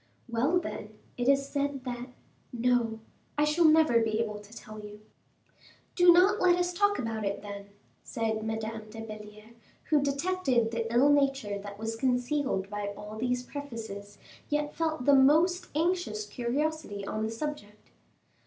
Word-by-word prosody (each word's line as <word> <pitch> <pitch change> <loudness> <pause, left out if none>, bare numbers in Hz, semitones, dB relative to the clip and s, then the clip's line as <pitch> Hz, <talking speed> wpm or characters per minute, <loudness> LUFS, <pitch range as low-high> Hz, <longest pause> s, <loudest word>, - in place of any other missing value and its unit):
"Well, 255 +10 +2
then, 215 -10 -7 0.2
it 245 +1 0
is 275 0 +3
said 280 -2 -2
that 245 -1 -5 0.4
no, 235 -2 +1 0.4
I 295 - +3
shall 300 +3 +3
never 310 -6 +6
be 220 -1 0
able 210 -2 -2
to 205 0 -16
tell 215 -2 -10
you." 210 0 -10 0.9
"Do 355 -1 +7
not 380 +5 +5
let 360 -1 +5
us 355 0 0
talk 405 +3 +2
about 225 -2 -3
it, 200 0 -2
then," 200 -1 -7 0.3
said 220 -1 -2
Madame 220 0 -4
de 225 +1 -9
Belliere, 215 0 -10 0.4
who 300 -2 +5
detected 280 -5 +1
the 230 -1 -2
ill 250 +5 +5
nature 275 -8 +1
that 200 0 -8
was 225 +1 -3
concealed 250 -3 0
by 205 0 -4
all 210 +1 -8
these 250 +2 -1
prefaces, 225 -8 -7 0.3
yet 295 0 -1
felt 315 -5 -1
the 285 - +6
most 315 +7 +4
anxious 325 - 0
curiosity 245 -1 -2
on 215 - -3
the 220 - -1
subject. 225 -4 -6
245 Hz, 155 wpm, -29 LUFS, 215-295 Hz, 0.9 s, Do